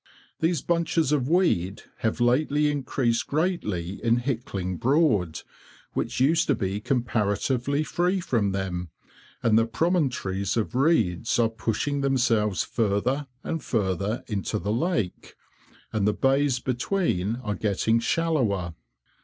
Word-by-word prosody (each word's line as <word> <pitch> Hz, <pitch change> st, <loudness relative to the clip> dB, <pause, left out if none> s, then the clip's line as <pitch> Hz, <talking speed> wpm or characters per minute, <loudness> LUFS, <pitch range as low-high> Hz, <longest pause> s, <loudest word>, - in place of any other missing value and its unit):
These 165 Hz, -2 st, +1 dB
bunches 165 Hz, -3 st, +1 dB
of 140 Hz, -3 st, +1 dB
weed 110 Hz, -, +1 dB
have 110 Hz, +1 st, -1 dB
lately 145 Hz, +5 st, +2 dB
increased 130 Hz, -4 st, 0 dB
greatly 105 Hz, -, -2 dB
in 115 Hz, 0 st, +3 dB
Hickling 115 Hz, -8 st, -3 dB
Broad, 115 Hz, -, +2 dB, 0.5 s
which -, -, -2 dB
used 160 Hz, +6 st, +3 dB
to 140 Hz, -, +3 dB
be 100 Hz, -1 st, -2 dB
comparatively 120 Hz, +3 st, 0 dB
free 180 Hz, +4 st, 0 dB
from 115 Hz, -, 0 dB
them, 90 Hz, -3 st, -3 dB, 0.5 s
and 110 Hz, -1 st, +4 dB
the 115 Hz, -, +1 dB
promontories 125 Hz, -, 0 dB
of 115 Hz, +1 st, -1 dB
reeds 115 Hz, -, +2 dB
are 115 Hz, -2 st, +3 dB
pushing 115 Hz, +5 st, -2 dB
themselves 120 Hz, -7 st, +2 dB
further 120 Hz, +6 st, 0 dB, 0.2 s
and 165 Hz, -1 st, -3 dB
further 100 Hz, +1 st, -1 dB
into 105 Hz, 0 st, -2 dB
the 105 Hz, 0 st, -2 dB
lake, 125 Hz, -, -2 dB, 0.6 s
and 105 Hz, -2 st, +1 dB
the 105 Hz, -, +3 dB
bays 135 Hz, +1 st, +2 dB
between 125 Hz, -, -1 dB
are 105 Hz, -3 st, -1 dB
getting 105 Hz, +3 st, +1 dB
shallower. 115 Hz, -, 0 dB
120 Hz, 125 wpm, -26 LUFS, 100-145 Hz, 0.6 s, and